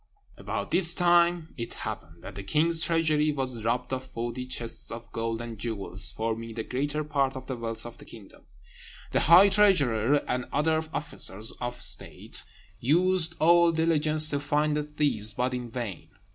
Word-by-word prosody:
About - - -5
this 175 -2 +5
time 175 -1 +2
it 115 -1 -6
happened 80 +2 -7
that - - -8
the 100 - -7
king's 160 +11 +2
treasury 155 -2 +2
was 130 -5 -3
robbed 125 +3 -1
of 130 0 -3
forty 120 0 -5
chests 120 -2 -3
of 115 0 -5
gold 115 0 -3
and 115 -2 -7
jewels, 100 -3 -1
forming 115 +2 -4
the 110 - -3
greater 145 +5 -2
part 140 -3 -1
of 130 0 -7
the 130 - -4
wealth 115 -1 -5
of 120 - -10
the - - -13
kingdom. 110 -4 -15 0.6
The - - +2
high 180 +6 +7
treasurer 145 - +3
and 125 0 -2
other 160 +2 +1
officers 125 -9 0
of 120 0 -3
state - - -1 0.4
used 170 +4 +2
all 170 +1 +5
diligence 155 -1 +3
to 145 - 0
find 150 +1 0
the 150 - 0
thieves, 145 -9 -1
but 125 +1 -1
in 125 -1 -5
vain. 110 -9 -6
130 Hz, 170 wpm, -27 LUFS, 115-155 Hz, 0.6 s, high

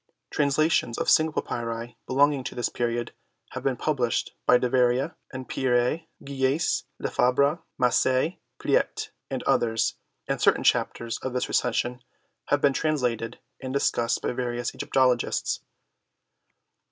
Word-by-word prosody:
Translations 145 -4 +2
of - - +1
single 155 -1 +3
papyri 115 0 -4
belonging 140 +1 +3
to - - -5
this 120 - -1
period 120 0 -2 0.4
have - - -5
been 135 -2 0
published 130 -6 0
by 125 - +7
Deveria 125 +1 +2 0.2
and 130 -1 -7
Pierret, 130 +5 +1 0.2
Guieyesse, 135 +3 0
Lefebure, 140 +6 +2 0.2
Massey, 130 +6 +2 0.2
Pleyte, - - 0 0.2
and - - -3
others, 115 -2 +1 0.3
and - - -2
certain - - +4
Chapters 115 -1 +1
of 130 - -4
this 125 - -1
Recension 125 +1 0 0.4
have 145 - +1
been 140 -1 +4
translated 125 -7 -1 0.2
and 130 -1 -5
discussed 120 -4 +1
by - - 0
various 120 -1 -2
Egypto 135 - 0
logists. 120 -1 -1
125 Hz, 130 wpm, -26 LUFS, 120-140 Hz, 0.4 s, by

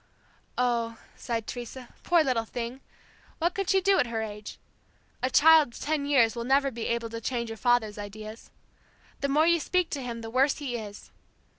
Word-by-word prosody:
"Oh," 235 -2 0 0.2
sighed 230 -2 -3
Teresa, 245 +1 -7
"poor 345 -2 +4
little 250 -5 +1
thing! 240 +3 -5 0.6
What 345 +2 0
could 390 -1 -2
she 385 -1 +4
do 390 +1 +3
at - - +2
her 225 -1 -2
age! 210 -1 -8 0.6
A 255 - +1
child 305 -4 +6
of - - -9
ten 295 -1 -1
years 250 -5 +4
will 235 - -3
never 275 +2 +2
be 235 -2 -4
able 235 -1 -2
to 230 0 -5
change 235 -1 -2
your 225 - -7
father's 230 -3 +1
ideas. 215 +2 -9 0.7
The 280 - -1
more 300 +3 +4
you 340 0 +4
speak 360 +2 0
to 280 - -3
him 235 -2 -5
the 225 0 -7
worse 265 +3 +3
he 275 -5 -4
is. 210 -3 -8
245 Hz, 190 wpm, -28 LUFS, 230-285 Hz, 0.7 s, child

